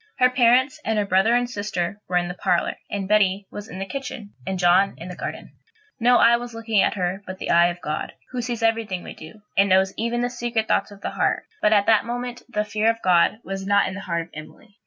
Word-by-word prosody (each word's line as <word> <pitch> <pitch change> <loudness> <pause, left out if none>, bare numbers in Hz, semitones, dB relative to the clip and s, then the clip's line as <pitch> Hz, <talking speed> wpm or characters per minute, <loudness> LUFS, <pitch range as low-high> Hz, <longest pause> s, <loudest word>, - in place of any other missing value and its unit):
Her 250 0 +4
parents, 250 +2 +3
and 220 -1 -1
her 205 - +1
brother 195 +5 +3
and 245 0 +1
sister, 205 -4 -3
were 180 - +2
in 175 0 0
the 175 - -4
parlour, 180 -1 0
and 200 -2 -3
Betty 200 -1 +2
was 205 +1 -8
in 180 - -8
the 195 - -3
kitchen, 265 -3 -7
and 190 - -2
John 180 +2 +3
was - - -23
in 175 - -8
the 180 - -7
garden. - - -6 0.5
No 245 +1 +5
eye 235 0 +6
was 240 -1 -8
looking 225 -3 +1
at - - +1
her 185 0 -2
but 185 0 -6
the - - -3
eye 170 0 +6
of 175 0 -5
God, 150 0 -4 0.2
who 250 -1 -3
sees 235 -1 -4
everything 225 -5 0
we - - -8
do, 205 +7 -13
and 200 +1 +4
knows 190 +1 +3
even 235 +2 -1
the 245 - 0
secret 240 -2 -2
thoughts - - +1
of 200 -1 -14
the - - -3
heart; - - 0 0.2
but 210 - +3
at 205 -2 +4
that 220 -2 +4
moment 245 +1 -4
the 210 -3 -1
fear 215 +1 +1
of 230 0 0
God 180 +2 +4
was 195 0 -5
not 200 0 +3
in - - -4
the 195 - -6
heart 170 -3 -2
of 165 - -17
Emily. 155 +7 -12
205 Hz, 255 wpm, -23 LUFS, 185-230 Hz, 0.5 s, eye